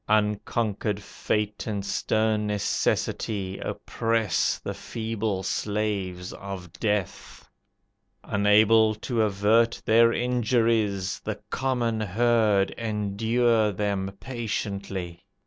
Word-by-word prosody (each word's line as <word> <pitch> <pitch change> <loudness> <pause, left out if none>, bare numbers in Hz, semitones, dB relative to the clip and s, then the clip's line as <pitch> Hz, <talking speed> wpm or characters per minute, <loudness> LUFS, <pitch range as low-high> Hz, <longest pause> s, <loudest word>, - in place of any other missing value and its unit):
Unconquered 105 0 0
Fate 105 0 -3
and 100 -2 -2
stern 110 +1 0
necessity 100 -1 -1
Oppress 115 -6 0
the - - -5
feeble 110 -3 -3
slaves 100 -4 -2
of 95 -3 -8
Death: 105 -3 -2 0.8
Unable 110 +2 +4
to 115 +2 -1
avert 110 +3 +3
their 115 +1 +5
injuries, 115 -5 +1
The - - -5
common 120 -4 0
herd 110 -1 +2
endure 110 +1 +1
them 100 -1 -2
patiently. 100 -7 -4
105 Hz, 85 wpm, -26 LUFS, 100-115 Hz, 0.8 s, their